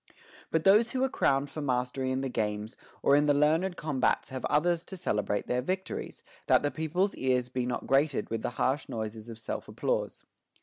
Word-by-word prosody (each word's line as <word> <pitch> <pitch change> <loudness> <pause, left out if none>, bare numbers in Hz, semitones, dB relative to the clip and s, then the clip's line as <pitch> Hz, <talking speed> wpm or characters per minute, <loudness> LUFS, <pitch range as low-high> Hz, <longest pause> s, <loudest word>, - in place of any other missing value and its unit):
But 160 -1 +1
those 210 +4 +6
who 260 0 +1
are 265 - +2
crowned 140 - +1
for 155 - -5
mastery 130 -1 -1
in 130 +1 -1
the 135 - -1
games 105 -2 -2 0.3
or 140 - +5
in 145 +1 +3
the 145 - +4
learned 160 +5 +2
combats 145 -5 0
have 130 -1 -6
others 170 +3 +2
to 190 - -8
celebrate 105 - -1
their 125 0 0
vic 185 +7 -2
tories, - - -6 0.2
that - - +5
the 145 - +1
people's 175 +5 0
ears 125 -1 0
be 125 -1 -2
not 125 - -3
grated 135 -4 +1
with 115 -1 -1
the - - -1
harsh 135 +3 0
noises 110 0 -5
of 115 - -8
self 110 - -5
applause. - - -2
135 Hz, 205 wpm, -29 LUFS, 125-160 Hz, 0.3 s, those